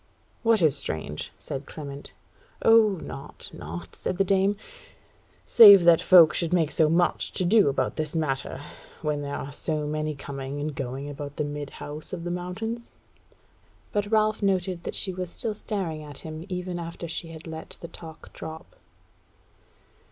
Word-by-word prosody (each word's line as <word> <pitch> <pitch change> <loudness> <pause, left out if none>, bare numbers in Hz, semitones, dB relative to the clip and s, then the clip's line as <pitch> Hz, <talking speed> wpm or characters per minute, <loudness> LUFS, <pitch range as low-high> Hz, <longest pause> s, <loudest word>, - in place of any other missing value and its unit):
"What 225 -5 +3
is 150 -3 +4
strange?" 75 - -4
said 135 +1 -6
Clement. 140 -2 -8 0.5
"O 225 -2 +6
naught, 135 - -8
naught," 85 +3 -8
said 185 - -3
the 195 - +4
dame, 195 +1 +2 0.9
"save 200 -5 +9
that 170 -1 +6
folk 170 -4 +7
should 170 -2 0
make 165 -4 +2
so 155 -1 +3
much 175 +2 +1
to 185 - +1
do 200 -3 +5
about 130 -2 -1
this 155 0 -3
matter, 140 -3 -2 0.4
when 150 -1 -1
there 140 0 -4
are 140 - -5
so 150 +1 -2
many 155 0 -2
coming 140 0 -6
and 150 +1 -3
going 135 +1 -5
about 145 0 -7
the 150 - 0
Midhouse 145 +1 -7
of 170 -2 -4
the 175 - -3
Mountains." 220 +7 -4 1.0
But 205 0 -1
Ralph 215 0 +2
noted 185 -3 0
that - - -3
she 190 - +2
was 180 -1 -4
still 220 +5 -2
staring 190 -7 -4
at 145 -2 -10
him 160 +3 -7
even 180 -1 -4
after 170 0 -6
she 165 +1 -3
had 160 -1 -10
let 160 -1 -8
the 170 - -7
talk 160 -2 -12
drop. 160 0 -9
160 Hz, 165 wpm, -26 LUFS, 145-185 Hz, 1.0 s, save